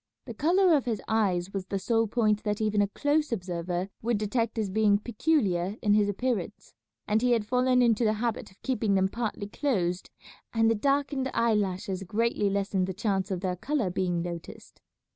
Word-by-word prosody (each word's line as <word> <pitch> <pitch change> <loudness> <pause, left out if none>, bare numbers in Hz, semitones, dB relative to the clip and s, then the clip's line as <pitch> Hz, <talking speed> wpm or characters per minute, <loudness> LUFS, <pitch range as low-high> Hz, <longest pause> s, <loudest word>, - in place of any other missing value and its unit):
The 235 - -7
colour 345 - +3
of 275 - 0
his 225 -4 -1
eyes 195 -4 0
was 195 -2 -4
the 195 - -2
sole 225 +3 +1
point 215 -1 +1
that 210 -1 -2
even 210 -1 +1
a 200 - +2
close 295 +7 0
observer 180 -2 -3
would 235 0 0
detect 225 +2 -1
as 210 -4 -1
being 210 0 +3
peculiar 205 - 0
in 205 -1 +4
his 205 -1 +3
appearance, 210 -2 -3 0.3
and 215 +1 +2
he 250 0 +3
had 225 -3 +1
fallen 250 +2 +3
into 235 -1 +3
the 215 -1 +3
habit 225 +1 -3
of 190 - -23
keeping 220 -6 0
them 190 0 +2
partly 220 -2 -3
closed 195 -7 -1 0.5
and 225 0 +4
the - - +4
darkened 275 +3 0
eye 230 -1 +3
lashes 195 -1 -1
greatly 210 +2 0
lessened 195 -1 0
the 190 - -4
chance 195 -1 -1
of 185 -3 -3
their 185 -2 -1
colour 240 - -1
being 175 -2 -1
noticed. 170 -1 -8
210 Hz, 190 wpm, -28 LUFS, 190-235 Hz, 0.5 s, in